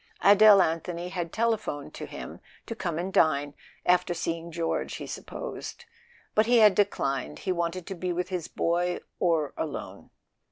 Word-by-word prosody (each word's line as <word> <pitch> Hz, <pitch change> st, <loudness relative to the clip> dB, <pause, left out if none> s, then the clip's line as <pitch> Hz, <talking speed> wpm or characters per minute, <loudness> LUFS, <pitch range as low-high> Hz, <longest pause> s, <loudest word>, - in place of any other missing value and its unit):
Adele 205 Hz, -1 st, +8 dB
Anthony 170 Hz, +2 st, -3 dB
had 175 Hz, -3 st, -4 dB
telephoned 220 Hz, -11 st, -1 dB
to -, -, -7 dB
him -, -, -8 dB, 0.3 s
to -, -, -5 dB
come 175 Hz, -7 st, -3 dB
and 185 Hz, +3 st, -3 dB
dine—after 160 Hz, +4 st, +1 dB
seeing 165 Hz, 0 st, -3 dB
George, 165 Hz, 0 st, -2 dB
he -, -, -6 dB
supposed; -, -, -7 dB, 0.5 s
but 215 Hz, +1 st, +3 dB
he 240 Hz, 0 st, +5 dB
had 215 Hz, -3 st, +7 dB
declined. 135 Hz, -, 0 dB
He -, -, -3 dB
wanted 170 Hz, 0 st, -2 dB
to 195 Hz, -, -5 dB
be 180 Hz, 0 st, -3 dB
with 180 Hz, +2 st, -2 dB
his 180 Hz, -4 st, -3 dB
boy, 175 Hz, +1 st, 0 dB, 0.2 s
or 165 Hz, -5 st, +1 dB
alone. 155 Hz, -3 st, -6 dB
175 Hz, 155 wpm, -27 LUFS, 165-195 Hz, 0.5 s, Adele